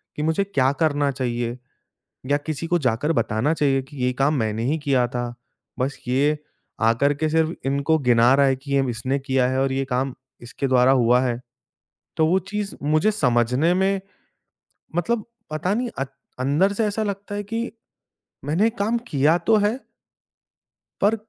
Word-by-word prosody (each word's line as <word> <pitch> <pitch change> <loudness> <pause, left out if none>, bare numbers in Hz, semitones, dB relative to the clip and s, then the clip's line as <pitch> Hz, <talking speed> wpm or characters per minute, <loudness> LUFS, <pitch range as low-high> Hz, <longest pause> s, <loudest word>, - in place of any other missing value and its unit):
कि 150 - -3
मुझे 160 +5 +1
क्या 135 -9 +1
करना 145 -3 +2
चाहिए 120 -2 -3 0.7
या 145 - +4
किसी 155 +2 -4
को 175 +1 +2
जाकर 130 +2 0
बताना 115 +2 0
चाहिए 135 -4 +1
कि 145 +3 -15
ये 125 0 +2
काम 135 +4 +1
मैंने 110 -1 -1
ही 150 +6 0
किया 135 -4 +2
था। 120 0 -4 0.4
बस 135 +2 -2
ये 145 +4 +2 0.4
आकर 115 +6 +3
के 155 +2 -1
सिर्फ़ 160 +1 +1
इनको 140 +4 +2
गिना 120 -2 +4
रहा 140 0 +4
है 135 -1 +2
कि 140 +2 -8
ये 140 - +4
इसने 130 +4 -2
किया 135 -2 +1
है 130 +1 0
और 135 0 +1
ये 135 +1 0
काम 130 0 -1 0.3
इसके 120 +3 -4
द्वारा 130 0 +5
हुआ 125 -1 +4
है। 120 -2 -1 0.8
तो 160 -1 +3
वो 180 +4 +3
चीज़ 210 -1 -3
मुझे 155 +7 +2
समझने 125 - +2
में 190 +1 +1 1.0
मतलब 215 +5 0 0.3
पता 155 +6 -1
नहीं 245 +3 -1
अ, 135 - 0 0.3
अंदर 145 +10 +2
से 220 +2 0
ऐसा 210 +1 -1
लगता 205 0 -4
है 205 - -2
कि, 225 +3 -3 0.7
मैंने 185 +10 +2
काम 225 +1 -1
किया 150 +4 +3
तो 215 +6 +3
है? 210 +4 +1 1.2
पर, 205 +3 +4
140 Hz, 170 wpm, -23 LUFS, 130-170 Hz, 1.2 s, द्वारा